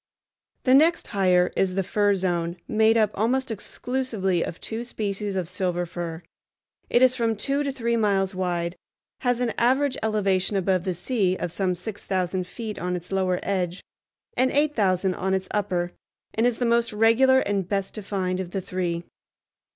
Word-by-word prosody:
The 255 - +4
next 320 +5 +5
higher 180 -2 +2
is 185 -1 +1
the 195 - +1
Fir 205 +2 +2
Zone, 175 -2 -1
made 220 +1 +4
up 215 -2 +3
almost 250 +4 0
exclusively 220 -5 -2
of 165 - -6
two 225 +1 -4
species 205 -4 -3
of 185 -3 -1
silver 180 -1 -1
fir. 170 -1 -6 0.7
It 245 - +4
is 255 0 +5
from 230 -3 +1
two 275 +7 0
to 280 -1 -1
three 235 -3 -1
miles 200 -3 +1
wide, 175 -2 -1 0.4
has 245 -1 0
an 240 -2 0
average 260 +3 +2
elevation 205 -3 +1
above 185 -1 +1
the 185 -2 -1
sea 190 -2 0
of 170 - -3
some 185 0 0
six 205 +4 -7
thousand 185 -1 -1
feet 220 +2 -6
on 180 +1 -1
its 175 +1 -7
lower 185 -2 +1
edge 180 -2 -2 0.5
and 260 - +3
eight 295 +2 +2
thousand 190 -4 +2
on 190 +1 0
its 190 0 -3
upper, 180 -4 -1 0.4
and 225 +2 +2
is 240 -2 0
the 245 - 0
most 235 0 +2
regular 230 +5 +5
and 195 -3 -1
best 195 -1 -1
defined 190 -3 -2
of 185 -2 -4
the 190 +1 -3
three. 175 -2 -2
195 Hz, 175 wpm, -25 LUFS, 185-230 Hz, 0.7 s, next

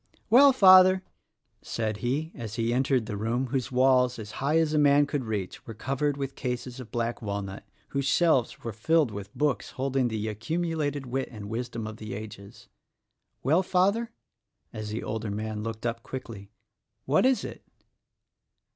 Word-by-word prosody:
"Well, 275 +4 +8
Father," 185 -5 +7 0.6
.said 110 -2 -3
he 140 +8 -2
as 115 -5 -7
he 115 0 0
entered 130 -2 +1
the 105 - -4
room 115 +5 -1
whose 130 0 -2
walls, 125 -1 +3
as 105 -2 -8
high 145 +4 +2
as 160 -2 +2
a 150 - +3
man 145 0 +5
could 140 -2 -3
reach, 105 -4 -4
were 115 - -7
covered 135 +5 -1
with 135 -1 -4
cases 125 0 -4
of 125 -3 -9
black 120 +1 -2
walnut 100 -2 -4 0.3
whose 140 -1 -1
shelves 155 -6 +2
were 115 - -4
filled 150 +5 +2
with 100 0 -7
books 145 -8 0
holding 135 -1 0
the 110 -2 -3
accumulated 145 +4 -2
wit 130 +2 -3
and 105 -3 -8
wisdom 115 -1 -4
of 110 0 -7
the 110 -2 -6
ages, 100 -1 -10 0.4
— - - -51
"Well, 155 +8 +4
Father?" 195 +5 +1 0.6
as 110 -1 -5
the 110 +2 -4
older 110 0 -3
man 105 +1 -4
looked 110 +1 -5
up 115 0 -2
quickly, 115 -6 -8 0.6
"What 145 +3 +3
is 255 -4 +3
it?" - - -7
125 Hz, 170 wpm, -27 LUFS, 110-145 Hz, 0.6 s, Well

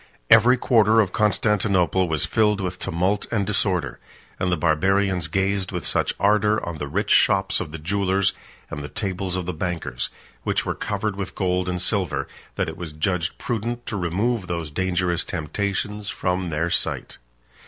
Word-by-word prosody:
35 - - -11
Every 125 +2 +5
quarter 110 -2 +4
of 100 -4 +2
Constantinople 100 -4 +2
was 80 -2 +1
filled 105 -2 +2
with 90 -1 -3
tumult 95 +5 0
and 105 -4 +1
disorder; 95 -3 0 0.4
and 90 - 0
the 90 - +2
Barbarians 95 +2 +2
gazed 95 +3 0
with 90 -4 -4
such - - +1
ardor 105 +1 +3
on 85 -3 -5
the 75 - -3
rich 100 +9 -1
shops 95 -2 +4
of 80 - -5
the 80 - -6
jewellers, 95 +3 +1 0.4
and 75 - -5
the 75 - -6
tables 95 -2 -3
of 90 -1 -2
the 90 - -3
bankers, 80 -7 -3 0.3
which - - 0
were - - -1
covered 110 -2 -2
with 100 -2 -5
gold 90 -1 0
and 90 0 -2
silver, 95 -3 0 0.3
that - - -1
it - - -6
was 85 -3 -7
judged 85 +2 -1
prudent 120 +1 -3
to 105 - -4
remove 100 +4 -1
those 85 -3 -3
dangerous 90 0 +1
temptations 100 +5 -3
from 90 -1 -1
their 85 +2 -1
sight. - - -1
95 Hz, 175 wpm, -23 LUFS, 85-100 Hz, 0.4 s, Every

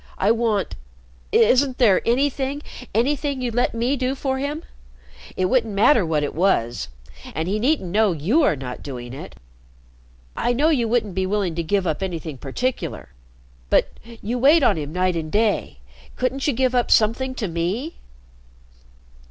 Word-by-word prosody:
"I 200 - +3
want 225 -4 0 0.6
isn't 255 +3 +4
there 215 -8 +4
anything 275 +3 0 0.3
anything 275 +4 0
you'd 245 -2 -2
let 245 0 +1
me 240 +4 +1
do 260 0 -1
for 265 -1 -2
him? 290 +3 -3 0.7
It 185 - +1
wouldn't 225 0 +1
matter 230 +2 +5
what 160 -3 0
it 145 - -2
was. 120 - +1 0.5
And 160 +1 -2
he 205 +3 0
needn't 245 - 0
know 215 0 +3
you 180 - +1
are 285 - +3
not 125 -2 -7
doing 125 -3 -7
it. 135 - -9 1.0
I 245 - 0
know 290 +6 +2
you 250 -8 +2
wouldn't 220 -4 0
be 190 +1 -1
willing 200 -3 0
to 170 - -2
give 190 +3 0
up 160 +1 -1
anything 165 -7 -4
particular. 245 - -3 0.6
But - - +3 0.3
you 240 +4 -2
wait 290 +5 +5
on - - +4
him 150 -2 -5
night 180 +1 0
and 155 -2 -4
day. 210 - 0 0.4
Couldn't 260 +2 -1
you 290 - +2
give 255 +1 +1
up 245 -1 +1
something 250 +4 +2
to 215 - -2
me?" 185 - -3
225 Hz, 165 wpm, -22 LUFS, 175-260 Hz, 1.0 s, matter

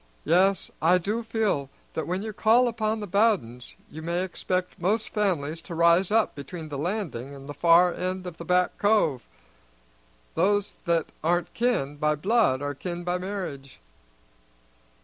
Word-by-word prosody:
Yes, 185 +3 +3
I 170 +4 +5
do 210 +6 -2
feel 220 - -1 0.2
that 160 - -3
when 185 +3 -2
you 220 -1 -5
call 230 +4 +4
upon 220 -1 -1
the 205 - -5
Bowdens 190 - 0
you 160 - -9
may 170 +3 -1
expect 180 -1 -3
most 210 +5 0
families 165 -7 -1
to 170 - -8
rise 170 +2 +4
up 220 +1 +2
between 155 +3 -8
the 145 - -5
Landing 150 - -3
and 135 0 -11
the 145 - -6
far 170 +3 +5
end 185 0 -3
of 175 -3 -7
the - - -7
Back 180 +1 +1
Cove. 205 - +2 1.1
Those 200 +4 +1
that 170 -2 0
aren't 175 +2 0
kin 220 - 0
by 150 +1 +1
blood 185 - +2
are 145 0 -2
kin 175 +4 -5
by 180 +1 -1
marriage." 180 -9 -6
180 Hz, 160 wpm, -26 LUFS, 155-205 Hz, 1.1 s, I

